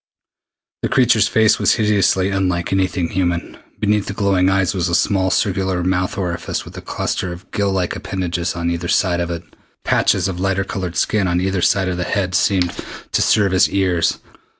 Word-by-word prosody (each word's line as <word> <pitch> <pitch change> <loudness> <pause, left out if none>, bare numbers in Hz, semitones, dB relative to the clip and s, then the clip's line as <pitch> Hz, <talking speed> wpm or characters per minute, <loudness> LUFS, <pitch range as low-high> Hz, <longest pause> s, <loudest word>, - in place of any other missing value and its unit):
The - - -1
creature's 120 -5 +3
face 110 -1 +3
was - - +3
hideously 100 -3 +2
unlike 90 -2 -1
anything 95 -3 0
human. 85 -2 -2 0.2
Beneath 105 -1 +1
the - - -3
glowing 95 -2 +2
eyes 95 -1 +1
was 90 -3 -1
a 85 - +1
small 95 -1 +1
circular 95 -2 0
mouth 95 +1 -1
orifice 90 -3 -3
with - - -12
a - - -7
cluster 90 - -3
of 90 +2 -11
gill 100 -1 0
like 95 -2 -1
appendages 90 -2 -3
on 85 0 -1
either 85 +1 -3
side 85 -1 +1
of 85 0 -2
it. 85 -1 -4 0.4
Patches 95 -1 +2
of 90 -2 -4
lighter 95 +1 0
colored 95 -2 -5
skin 105 -3 +1
on 90 0 +1
either 95 0 -1
side 95 +2 +2
of 90 -1 -2
the 90 - -1
head 95 0 -1
seemed 90 -1 +2 0.4
to - - +1
serve 100 -3 +3
as 95 - +4
ears. 90 -4 +1
95 Hz, 190 wpm, -19 LUFS, 90-95 Hz, 0.4 s, as